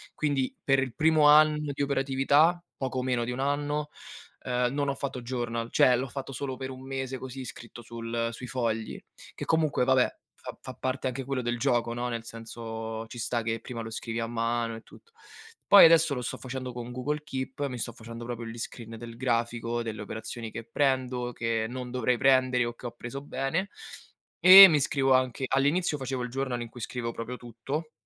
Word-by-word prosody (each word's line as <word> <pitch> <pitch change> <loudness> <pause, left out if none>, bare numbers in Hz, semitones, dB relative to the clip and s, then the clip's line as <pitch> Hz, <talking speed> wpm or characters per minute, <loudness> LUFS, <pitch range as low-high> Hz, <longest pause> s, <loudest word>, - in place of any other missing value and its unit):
quindi 140 -4 -1
per 135 -1 +3
il 130 -3 -6
primo 155 -1 +4
anno 150 0 +5
di 140 - -5
operatività, 140 +4 +3 0.2
poco 130 -1 -2
meno 125 -2 0
di 120 - -3
1 125 - -5
anno, 145 +2 -1 0.5
ehm, 125 0 0
non 145 0 0
ho 140 - -1
fatto 135 -2 -4
journal, 120 -1 -3
cioè 125 - +5
l'ho 130 +2 -2
fatto 135 +1 -6
solo 130 0 -4
per 130 0 -5
1 130 0 -9
mese 135 -1 -4
così, 130 0 -7
scritto 120 -1 -10
sul 115 0 -3
sui 125 +2 -8
fogli, 115 -3 -2 0.3
che - - -6
comunque, 155 -5 +2
va 130 - +4
beh, 125 - +2 0.2
fa - - -9
fa 130 - -8
parte 130 +1 -2
anche 130 +1 -3
quello 135 -1 -2
del 120 0 -2
gioco, 120 -2 +1
no, 120 +1 -3
nel 115 -1 -4
senso 115 -1 -6
ci 120 - -10
sta 120 +1 -1
che 115 0 -2
prima 115 -1 -6
lo 115 - -6
scrivi 115 +1 -4
a 115 - -2
mano 115 0 -1
e 115 - -9
tutto. 460 - -19 0.6
Poi, 200 - +10
adesso 165 -2 +5
lo 125 - -3
sto 120 - -4
facendo 130 -1 -6
con 120 0 -6
Google 145 +5 -2
Keep, 135 0 -4
mi 125 -2 -5
sto 120 - -4
facendo 115 +1 -9
proprio 120 -1 -5
gli 115 +1 -7
screen 115 0 -7
del 115 0 -9
grafico, 120 -1 -1
delle 110 -2 -5
operazioni 110 +2 -6
che 115 +2 -6
prendo, 130 -1 0
che 115 -1 -1
non 125 0 -6
dovrei 125 0 +1
prendere 130 -1 +3
o 120 - -4
che 120 - -14
ho - - -6
preso 120 +3 -7
bene, 145 +7 -2 0.7
e 190 +2 +12
mi 155 -5 +3
scrivo 135 -1 +2
anche 130 0 +1
all'inizio 145 +5 +1
facevo 130 -2 -3
il 125 - -4
journal 130 -1 -2
in 120 - -5
cui 120 - -11
scrivevo 115 +1 -4
proprio 120 +2 -6
tutto, 130 +7 -5
125 Hz, 205 wpm, -28 LUFS, 115-135 Hz, 0.7 s, e